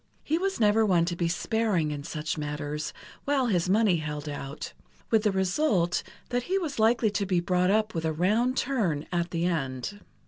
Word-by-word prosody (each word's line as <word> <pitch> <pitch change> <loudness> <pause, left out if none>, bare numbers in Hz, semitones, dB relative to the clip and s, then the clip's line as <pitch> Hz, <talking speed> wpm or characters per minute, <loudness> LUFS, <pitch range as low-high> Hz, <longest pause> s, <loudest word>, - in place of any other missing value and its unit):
He 320 +3 0
was 385 +1 -1
never 215 0 +4
one 180 -5 +3
to 175 0 -2
be 170 -1 0
sparing 185 -3 0
in 145 -1 -5
such 155 +1 -3
matters 150 0 -4 0.3
while 280 -2 +2
his 180 -6 +1
money 205 -3 +4
held 150 -1 -5
out, 145 0 -6 0.4
with 225 -2 +5
the 210 -1 +2
result 190 - +1 0.3
that 245 0 0
he 380 - +2
was 315 -9 -3
likely 225 0 +3
to 200 0 -1
be 180 -2 +2
brought 180 +1 +1
up 215 +1 +2
with 165 -1 -2
a 160 - +1
round 215 - +1
turn, 200 - 0
at 175 -1 0
the 170 0 -1
end. 155 +2 -2
180 Hz, 195 wpm, -27 LUFS, 160-225 Hz, 0.4 s, with